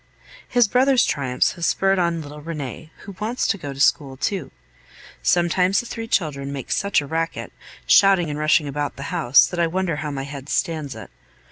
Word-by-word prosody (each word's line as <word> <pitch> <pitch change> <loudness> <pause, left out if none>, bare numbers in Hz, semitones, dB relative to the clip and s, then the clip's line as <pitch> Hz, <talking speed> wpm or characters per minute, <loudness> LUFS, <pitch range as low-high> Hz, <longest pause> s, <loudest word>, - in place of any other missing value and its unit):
His 245 -3 +3
brother's 255 +2 +3
triumphs 130 -3 0
have 170 - -9
spurred 195 +2 +2
on 170 -2 0
little 150 +1 -10
Rene, 155 -2 -6
who 200 - -9
wants 230 +4 -2
to 200 - +1
go 145 -4 -6
to 135 - -9
school 135 -2 +2
too. 185 -1 -2 0.7
Sometimes 180 +2 +2
the - - -4
three 225 -1 -6
children 140 -9 -1
make 135 -3 -6
such 200 -6 +1
a - - -7
racket, 165 +3 -3 0.3
shouting 195 -4 +5
and 150 0 -4
rushing 155 0 +3
about 145 +1 -3
the 140 +6 -6
house, 135 -7 +5
that 175 - -5
I 170 - +3
wonder 175 -2 -1
how 150 0 -4
my 135 -2 -4
head 140 0 -8
stands 155 -6 -2
it. - - -10
160 Hz, 195 wpm, -22 LUFS, 145-190 Hz, 0.7 s, shouting